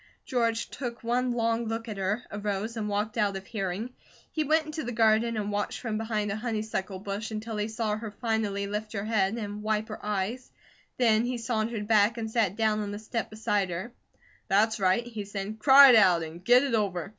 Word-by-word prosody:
George 230 -2 0
took 240 -3 -6
one 245 +2 +1
long 230 0 0
look 225 +1 -3
at 215 -3 -5
her, 195 +5 -1
arose, 205 +2 -3
and 215 -2 -3
walked 210 +2 -2
out 200 -2 +1
of 195 - -9
hearing. 200 +3 -3 0.4
He 310 - 0
went 310 +2 +2
into 310 +1 -5
the 245 - -4
garden 225 0 +3
and 210 -1 -2
watched 205 0 -2
from 220 -3 -3
behind 215 -2 -1
a - - -2
honeysuckle 215 -4 -3
bush 200 +3 -5
until 220 +1 -5
he 210 0 -1
saw 220 -1 -2
her 220 0 -5
finally 210 -2 -1
lift 210 +2 -4
her 200 -1 -3
head 215 -2 +1
and 205 -2 -5
wipe 215 0 -1
her 215 - -7
eyes; 210 +5 -2 0.5
then 225 -3 +4
he 250 0 -2
sauntered 225 -2 -2
back, 215 +1 +4
and 220 -1 -4
sat 220 -5 +1
down 220 -1 +1
on 205 -1 -3
the 205 - -5
step 220 +2 -4
beside 210 -3 -1
her. 185 +8 -5 0.5
"That's 215 +3 +2
right," 190 +4 +2
he 225 -3 -6
said. 200 +2 -5
"Cry 275 +3 +9
it - - +7
out, 185 -6 +5
and 165 +2 -9
get 245 +5 +6
it 275 -3 -1
over. 195 -5 0
215 Hz, 210 wpm, -28 LUFS, 205-230 Hz, 0.5 s, Cry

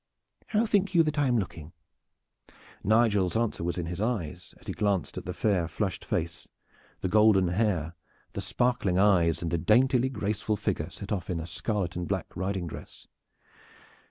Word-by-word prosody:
How 220 +1 +2
think 200 -3 +1
you 165 - +7
that 155 -1 -1
I 145 - +3
am 125 -1 +3
looking?" 85 -5 -5 1.1
Nigel's 105 -3 +3
answer 115 -7 -1
was 85 +1 -2
in 90 - -2
his 90 +3 -4
eyes 90 -7 -3
as - - -19
he - - -3
glanced 100 -5 0
at - - -6
the 90 - -3
fair 95 -3 +1
flushed 95 0 -3
face, 85 +1 -3 0.5
the - - 0
golden 100 -2 +5
hair, 90 -4 0 0.4
the - - -3
sparkling 120 -7 +1
eyes 90 -5 +3
and 85 - -2
the 85 - +1
daintily 125 - +3
graceful 105 -2 -1
figure 90 -6 -2
set 100 +3 -9
off 95 -5 -2
in 90 -2 -1
a 80 - -5
scarlet 85 +3 -2
and 90 -1 -3
black - - -3
riding 95 0 -2
dress. 80 - -9
95 Hz, 175 wpm, -28 LUFS, 85-110 Hz, 1.1 s, you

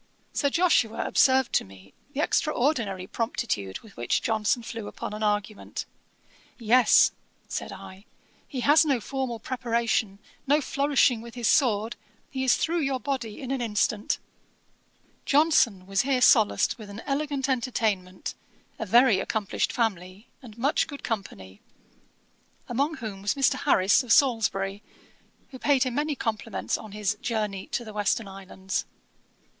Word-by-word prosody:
Sir 285 - +1
Joshua 330 -9 +2
observed 265 0 +3
to - - +3
me 95 0 -16 0.2
the 290 - 0
extraordinary 240 - 0
promptitude 190 - -3
with 220 -3 -17
which 120 - -1
Johnson 225 +1 0
flew 225 -2 -6
upon - - -6
an 210 - -6
argument. 210 0 -2 0.7
'Yes, 235 0 +5 0.4
(said - - -4
I,) 190 +2 -11 0.4
he 260 -4 -5
has 295 +5 +6
no 280 -5 +1
formal 260 0 -3
preparation, 230 -4 -1 0.3
no 290 +2 +4
flourishing 275 -4 +2
with 235 +1 -11
his 240 -2 -1
sword; 225 -5 +2 0.3
he 265 -1 -2
is 260 - +4
through 340 +2 0
your 270 -4 -1
body 250 -6 -4
in 260 -1 -5
an 270 -2 -1
instant.' 210 -2 0 1.1
Johnson 270 - +3
was 195 0 +1
here 265 -1 +1
solaced 225 -1 +4
with 210 -2 -10
an 205 +3 -8
elegant 280 -1 -1
entertainment, 220 -8 -1 0.5
a 220 - -4
very 235 -1 +5
accomplished 210 0 -1
family, 195 -3 -2 0.2
and 230 -4 -13
much 275 +7 +1
good 285 -3 -9
company; 100 - -5 1.1
among 280 +6 0
whom 215 -8 -7
was 205 +6 0
Mr. 275 -1 +3
Harris 200 -8 +3
of 250 -3 -5
Salisbury, 205 -6 +2 0.7
who 260 - -9
paid 280 -2 +3
him 255 -2 -2
many 295 +2 -1
compliments 225 -2 -2
on 215 - -8
his 210 0 -2
Journey 215 -6 -2
to 240 - -3
the 215 - -9
Western 210 +1 0
Islands. 190 -1 -5
230 Hz, 145 wpm, -26 LUFS, 205-265 Hz, 1.1 s, has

